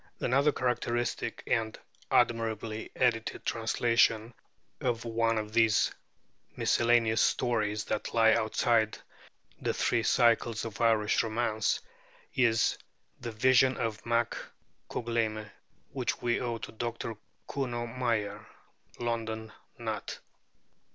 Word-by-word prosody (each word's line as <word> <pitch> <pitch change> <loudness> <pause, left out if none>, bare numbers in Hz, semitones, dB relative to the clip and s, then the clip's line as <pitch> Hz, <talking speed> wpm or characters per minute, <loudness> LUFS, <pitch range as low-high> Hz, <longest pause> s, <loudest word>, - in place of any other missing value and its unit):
Another 140 +4 +3
characteristic 120 -2 -1
and 110 -1 0 0.3
admirably 110 -1 0
edited 115 -3 0
translation 115 0 +2 0.5
of 120 -2 -1
one 115 0 +1
of 105 0 -4
these 110 -2 +4 0.6
miscellaneous 115 -1 +3
stories 110 -4 +1
that 105 - -3
lie 115 -1 +5
outside 110 0 +2 0.6
the - - -1
three 115 - +1
cycles 115 -1 +2
of 110 -2 -6
Irish 110 -2 +3
romance 110 -1 0 0.5
is 115 -3 +2 0.4
'The 120 -2 -5
Vision 130 +3 +4
of 110 -2 -3
Mac 115 0 +1 0.5
Cougleime,' 110 -3 -2 0.4
which - - -2
we 120 -1 0
owe 120 -2 -2
to - - -8
Dr. 115 0 -4 0.3
Kuno 120 -4 -2
Meyer 115 -4 -2 0.5
(London: 110 -2 -3 0.3
Nutt). - - -4
115 Hz, 105 wpm, -30 LUFS, 110-120 Hz, 0.6 s, lie